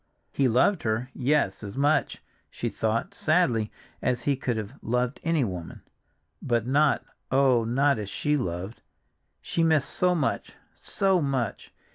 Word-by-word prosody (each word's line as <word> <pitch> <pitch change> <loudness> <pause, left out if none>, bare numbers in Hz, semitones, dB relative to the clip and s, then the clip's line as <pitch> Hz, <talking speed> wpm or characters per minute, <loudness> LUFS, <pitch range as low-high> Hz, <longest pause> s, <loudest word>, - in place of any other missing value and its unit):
He 135 - +2
loved 130 - +3
her—yes, 125 0 0
as 100 +4 -7
much, 145 +3 +1 0.3
she - - -3
thought, 115 - -1
sadly, 155 - +1 0.3
as 125 -2 0
he 140 - +2
could 125 -3 -2
have 105 -2 -5
loved 125 +2 -1
any 165 -3 +2
woman, 90 -6 -6 0.6
but 120 -3 0
not, 145 +3 +2 0.2
oh, 130 -3 +4
not 135 +2 +2
as 105 -2 -5
she 150 +7 0
loved! 95 -3 -4 0.6
She 170 - -2
missed 160 -4 +2
so 180 0 +2
much, 155 - -1 0.2
so 190 -2 +1
much! 130 -7 -2
130 Hz, 140 wpm, -26 LUFS, 115-150 Hz, 0.6 s, oh